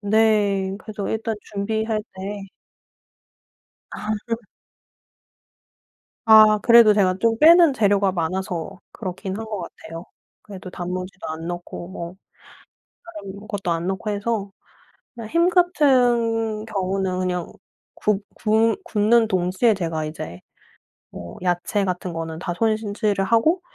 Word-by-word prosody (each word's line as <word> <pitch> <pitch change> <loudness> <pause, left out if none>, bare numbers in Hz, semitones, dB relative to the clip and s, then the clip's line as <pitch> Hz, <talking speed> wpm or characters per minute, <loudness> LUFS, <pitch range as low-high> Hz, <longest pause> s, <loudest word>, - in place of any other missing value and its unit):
네 205 -2 +2
그래서 215 -2 -6
일단 225 0 -2
준비할 220 +1 -2
때 200 +2 -6 1.5
아. 210 - -7 2.2
아 215 -1 +7
그래도 235 -2 +7
제가 185 -3 +2
좀 225 -1 +2
빼는 330 0 +7
재료가 200 -4 +2
많아서 180 +1 -3
그렇기는 190 0 -5
한 225 - -5
것 210 -2 -4
같아요. 165 0 -9 0.4
그래도 190 -2 -10
단무지도 185 +1 -6
안 160 +1 -6
넣고 175 0 -6
뭐 175 -1 -7 1.1
다른 200 +2 -10
것도 200 -5 -3
안 170 +2 -1
넣고 195 +3 -3
해서 205 -1 -2 0.6
그냥 230 -2 -8
햄 340 +1 +3
같은 245 - +2
경우는 190 -2 -2
그냥 180 -2 -2 0.4
굽 210 -1 0
굽 225 - +1
굽는 225 -3 +3
동시에 185 +4 +2
제가 165 -4 -3
이제 155 - -7 0.7
뭐 85 -1 -9
야채 180 +3 0
같은 180 -1 -3
거는 165 -1 -5
다 175 0 -3
손질을 215 -2 0
하고 270 - +2
200 Hz, 225 characters per minute, -22 LUFS, 185-220 Hz, 2.2 s, 아